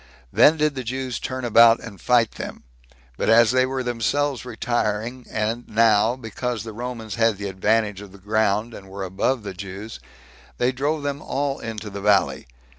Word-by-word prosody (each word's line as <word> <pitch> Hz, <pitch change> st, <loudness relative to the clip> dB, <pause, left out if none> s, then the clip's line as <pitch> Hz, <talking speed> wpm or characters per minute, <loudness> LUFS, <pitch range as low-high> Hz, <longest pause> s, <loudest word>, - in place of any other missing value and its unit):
Then 155 Hz, +2 st, +6 dB
did 150 Hz, -1 st, +1 dB
the 130 Hz, -2 st, -5 dB
Jews 130 Hz, 0 st, -3 dB
turn 130 Hz, -1 st, -4 dB
about 115 Hz, 0 st, +6 dB
and 105 Hz, -4 st, -10 dB
fight 120 Hz, -3 st, +3 dB
them; -, -, -8 dB, 0.5 s
but -, -, 0 dB
as 115 Hz, 0 st, +6 dB
they 130 Hz, 0 st, +3 dB
were 130 Hz, 0 st, -2 dB
themselves 125 Hz, +3 st, -1 dB
retiring, 120 Hz, 0 st, -2 dB
and 115 Hz, +3 st, -2 dB
now, 110 Hz, +1 st, +4 dB
because 120 Hz, -1 st, -4 dB
the 110 Hz, -1 st, -7 dB
Romans 115 Hz, -2 st, -6 dB
had 115 Hz, -3 st, +3 dB
the 100 Hz, 0 st, -4 dB
advantage 105 Hz, +1 st, 0 dB
of 100 Hz, -2 st, -11 dB
the 100 Hz, -, -14 dB
ground, 105 Hz, +2 st, 0 dB
and 95 Hz, -2 st, -11 dB
were 95 Hz, 0 st, -6 dB
above 105 Hz, +6 st, -1 dB
the 100 Hz, -, -5 dB
Jews, 100 Hz, -, -8 dB, 0.6 s
they 125 Hz, +1 st, +2 dB
drove 145 Hz, +3 st, -1 dB
them 145 Hz, 0 st, -3 dB
all 140 Hz, -1 st, -2 dB
into 110 Hz, -2 st, -6 dB
the 100 Hz, 0 st, -6 dB
valley. 100 Hz, -8 st, +2 dB
115 Hz, 180 wpm, -23 LUFS, 105-125 Hz, 0.6 s, Then